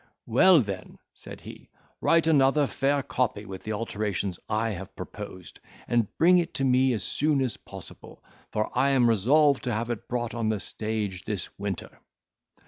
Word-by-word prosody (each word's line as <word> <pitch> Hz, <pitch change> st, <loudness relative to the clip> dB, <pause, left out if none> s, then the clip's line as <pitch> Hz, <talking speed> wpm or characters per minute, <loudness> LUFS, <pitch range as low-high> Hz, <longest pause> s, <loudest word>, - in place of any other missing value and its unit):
"Well, 180 Hz, -8 st, +6 dB
then," 100 Hz, -3 st, -7 dB, 0.2 s
said -, -, -11 dB
he, -, -, -12 dB, 0.3 s
"write 165 Hz, -1 st, +4 dB
another 145 Hz, -2 st, +4 dB
fair 140 Hz, +1 st, 0 dB
copy 110 Hz, -6 st, -1 dB
with 95 Hz, -2 st, -8 dB
the 110 Hz, -, -4 dB
alterations 105 Hz, -4 st, -3 dB
I 110 Hz, +1 st, 0 dB
have 95 Hz, -1 st, -8 dB
proposed, 95 Hz, -1 st, -9 dB, 0.3 s
and 120 Hz, -3 st, +2 dB
bring 180 Hz, +2 st, +6 dB
it 170 Hz, -, -3 dB
to 135 Hz, -, 0 dB
me 130 Hz, 0 st, +3 dB
as 105 Hz, -4 st, -2 dB
soon 150 Hz, +5 st, +1 dB
as 130 Hz, -5 st, -1 dB
possible; -, -, -11 dB, 0.3 s
for 110 Hz, 0 st, -2 dB
I 140 Hz, -, +3 dB
am 130 Hz, -3 st, +4 dB
resolved 135 Hz, +7 st, +4 dB
to 125 Hz, -, -1 dB
have 115 Hz, +3 st, -2 dB
it 115 Hz, -, -5 dB
brought 120 Hz, -1 st, -2 dB
on 115 Hz, -2 st, -1 dB
the 110 Hz, -2 st, 0 dB
stage 105 Hz, -4 st, -4 dB
this 105 Hz, -6 st, -4 dB
winter." 100 Hz, -2 st, -5 dB
115 Hz, 170 wpm, -27 LUFS, 105-135 Hz, 0.3 s, Well